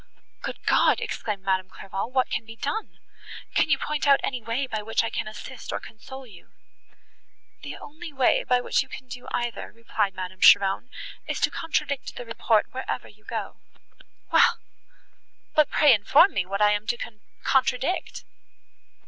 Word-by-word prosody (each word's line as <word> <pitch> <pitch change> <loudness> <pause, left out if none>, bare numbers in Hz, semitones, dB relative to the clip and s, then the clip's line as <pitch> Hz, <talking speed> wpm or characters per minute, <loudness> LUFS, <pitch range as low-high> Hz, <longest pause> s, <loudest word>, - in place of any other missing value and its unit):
"Good - - -6
God!" - - +4
exclaimed 205 -3 -4
Madame 190 -1 0
Clairval, 195 +4 -5
"what 255 -1 +1
can - - -1
be 225 0 -11
done? 290 - -4 0.6
Can - - +3
you 275 - +4
point 300 +1 -2
out 275 -1 +6
any 255 -2 -2
way, 230 +5 -1
by 220 -4 -3
which 225 +2 0
I 230 - -2
can - - -3
assist, 225 +3 -8
or - - -2
console 265 +4 -11
you?" 205 -7 -16 1.1
"The - - -7
only 320 +2 -9
way, 265 -3 +3
by 250 -1 +2
which - - +2
you 265 - -8
can 260 - -9
do 250 0 -9
either," 240 -1 -3
replied 220 -3 -2
Madame 185 0 -6
Cheron, 195 +5 +6 0.4
"is - - -2
to - - +3
contradict 300 -4 -2
the 245 - -7
report 230 -1 +2
wherever 260 +1 -4
you 215 +1 -20
go." 220 -3 -5 0.7
"Well! - - +5 1.0
but 305 -1 +4
pray 295 -4 +6
inform 235 - +5
me 180 -2 -1
what 200 +2 0
I 210 - +6
am 210 +1 -1
to 240 - 0 0.5
contradict." 265 +6 0
235 Hz, 165 wpm, -25 LUFS, 210-270 Hz, 1.1 s, out